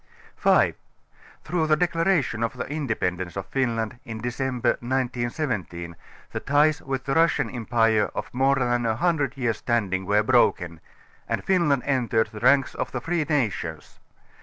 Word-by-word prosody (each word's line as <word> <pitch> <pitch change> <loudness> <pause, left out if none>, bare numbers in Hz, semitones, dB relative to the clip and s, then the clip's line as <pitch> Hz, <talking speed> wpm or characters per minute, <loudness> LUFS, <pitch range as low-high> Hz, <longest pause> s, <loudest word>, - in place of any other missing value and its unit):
5) - - +3 0.7
Through 160 -1 0
the 155 - +4
Declaration 165 -7 +1
of 115 - -1
the - - -3
Ind├®pendance 100 - -3
of 95 - -4
Fin 130 -4 0
land 115 +1 -3
in 110 -1 -7
December 125 +1 -1
1917 120 - -3 0.4
the - - -3
ties 150 +2 +2
with 135 -1 -3
the 135 - -1
Russian 165 +2 +2
Empire 115 -2 +1
of - - -5
more 135 +2 +3
than 120 -2 0
a 110 - +1
hundred 145 -2 0
years' 120 -5 0
standing 95 -6 -1
were 105 +1 +3
broken, 90 -9 +2 0.5
and - - -1
Fin 180 -5 +2
land 140 -3 +2
entered 120 -5 +1
the 105 - -8
ranks 135 +3 +3
of - - -4
the 125 - -3
free 165 +3 -1
nations. 135 - -2
125 Hz, 160 wpm, -25 LUFS, 110-145 Hz, 0.7 s, the